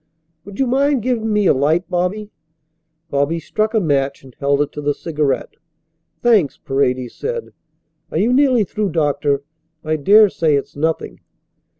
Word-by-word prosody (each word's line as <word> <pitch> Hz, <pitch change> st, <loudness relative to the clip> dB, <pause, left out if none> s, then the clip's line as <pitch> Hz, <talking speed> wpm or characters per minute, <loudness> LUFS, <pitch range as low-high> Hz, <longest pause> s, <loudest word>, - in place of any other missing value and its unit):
"Would 200 Hz, 0 st, -11 dB
you 270 Hz, -, +3 dB
mind 270 Hz, 0 st, +1 dB
giving 225 Hz, -3 st, -1 dB
me 210 Hz, -1 st, +2 dB
a -, -, +5 dB
light, 155 Hz, +7 st, +1 dB
Bobby?" 185 Hz, +4 st, -2 dB, 0.8 s
Bobby 145 Hz, +4 st, 0 dB
struck 215 Hz, +7 st, -2 dB
a -, -, +4 dB
match 140 Hz, -6 st, 0 dB
and 130 Hz, -2 st, -15 dB
held 140 Hz, 0 st, +1 dB
it 145 Hz, -, -8 dB
to 150 Hz, -, -7 dB
the 145 Hz, 0 st, 0 dB
cigarette. 150 Hz, -4 st, -2 dB, 0.7 s
"Thanks," 205 Hz, -, +3 dB
Paredes 130 Hz, -2 st, -1 dB
said. 475 Hz, 0 st, -5 dB, 0.6 s
"Are -, -, -3 dB
you 235 Hz, +4 st, +2 dB
nearly 260 Hz, -4 st, +4 dB
through, 205 Hz, -2 st, -3 dB
doctor? 145 Hz, -3 st, 0 dB, 0.4 s
I 155 Hz, 0 st, -1 dB
daresay 190 Hz, -3 st, +4 dB
it's 140 Hz, 0 st, -3 dB
nothing." 160 Hz, +2 st, -2 dB
165 Hz, 155 wpm, -19 LUFS, 140-215 Hz, 0.8 s, a